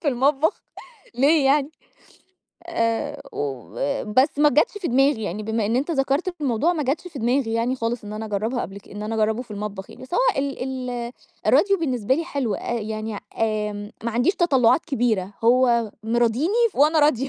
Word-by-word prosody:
في 310 - -1
المطبخ 280 - +1 0.5
ليه 285 +4 +4
يعني! 280 +1 +3 1.0
آآ 285 -1 -1
وبس 230 - -1
ما 295 - +6
جتش 300 +2 +3
في 360 - -3
دماغي 270 -1 +3
يعني 205 +3 -4
بما 220 0 -1
إن 225 +3 +1
أنت 275 +6 -1
ذكرت 285 +4 0
الموضوع، 280 +4 +1
ما 320 -4 -2
جتش 295 +7 -2
في 315 - -9
دماغي 240 0 +1
يعني 235 +3 0
خالص 230 -1 -3
إن 205 - -7
أنا 215 +1 -5
أجربها 220 +4 -2
قبل 195 +1 -7
ك - - -20
إن 205 +1 -7
أنا 215 +1 -3
اجربه 220 +2 +1
في 240 - -21
المطبخ 205 -2 -6
يعني. - - -13
بس 260 +7 -7
هو - - +3 0.2
ال 275 -1 -2 0.3
ال 240 -1 -4 0.3
الراديو 395 -1 +4
بالنسبة 255 -6 0
لي 330 +4 -2
حلو 265 - -2
آآ - - -4
يعني 215 -1 -4 0.2
آمم 210 -2 -1
ما 235 - 0
عنديش 245 - +2
تطلعات 275 - +3
كبيرة 220 - 0
هو 235 -2 +4
مراضيني 240 - +2
وأنا 305 +3 +4
راضية. 275 -3 +3
245 Hz, 180 wpm, -23 LUFS, 220-285 Hz, 1.0 s, ما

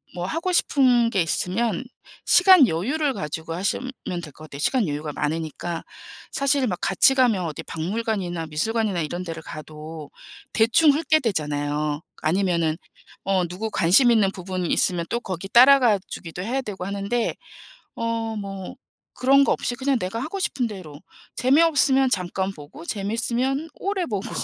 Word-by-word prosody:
뭐 175 0 -3
하고 330 - -2
싶은 250 -8 +3
게 190 - +1
있으면 185 +7 0 0.5
시간 360 -6 +8
여유를 270 - -1
가지고 160 - -5
하시면 200 +9 -2 0.3
될 155 - -9
것 155 - -12
같아요, 140 -2 -10
시간 220 - +1
여유가 150 0 -4
많으니까. 160 +3 -4 0.5
사실은 275 -1 +2
막 180 -5 -3
같이 195 +7 +5
가면 240 -9 +2
어디 155 -3 -5
박물관이나 180 -1 -3
미술관이나 200 +4 -1
이런 175 +4 -4
데를 165 -2 -7
가도 155 0 -9 0.4
대충 230 +8 +4
훑게 310 +2 +2
되잖아요. 150 - -2 0.2
아니면은 170 -2 +1 0.5
어 190 -2 +1
누구 190 +6 -5
관심 205 +7 +5
있는 215 -5 +3
부분이 185 -2 -4
있으면 175 -3 +1
또 235 - 0
거기 190 -4 -6
따라가 245 -1 +6
주기도 170 0 -7
해야 245 +8 -2
되고 200 -7 -6
하는데 200 +4 -2 0.6
어 230 -1 -3
뭐 195 -2 -7 0.4
그런 275 +2 +4
것 - - +2
없이 - - -3
그냥 270 +1 0
내가 190 +4 -4
하고 320 +10 -5
싶은 275 -9 -1
대로 170 -8 -10 0.4
재미없으면 270 -1 +4
잠깐 190 0 -1
보고 150 0 -12
재미있으면 235 - -1
오래 390 -2 -2
보고. 215 - -4
200 Hz, 335 characters per minute, -23 LUFS, 170-255 Hz, 0.6 s, 시간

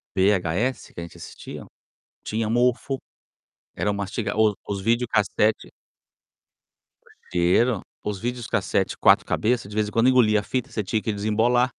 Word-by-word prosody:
o - - -1
VHS 95 +5 +1
que - - -9
a 85 - -4
gente 85 - -11
assistia - - -9 0.6
tinha 110 0 -2
mofo, 125 +3 +1 0.8
era 105 - 0
um - - -1
masti 100 +3 -3
o 110 -1 +3
os 100 -1 -2
videocassetes 110 -2 +1 1.6
cheiro, 95 +6 +2 0.2
os 105 -2 -3
videocassetes 120 +1 -1
4 - - +5
cabeças 115 -2 0
de 105 - -9
vez 105 -1 +1
em - - -6
quando 115 +4 +4
engoliam 110 -5 +4
a - - -5
fita, 120 +5 -3
você 105 - -2
tinha 105 +3 -1
que 110 - -2
desembolar 110 +5 +2
110 Hz, 155 wpm, -24 LUFS, 100-120 Hz, 1.6 s, 4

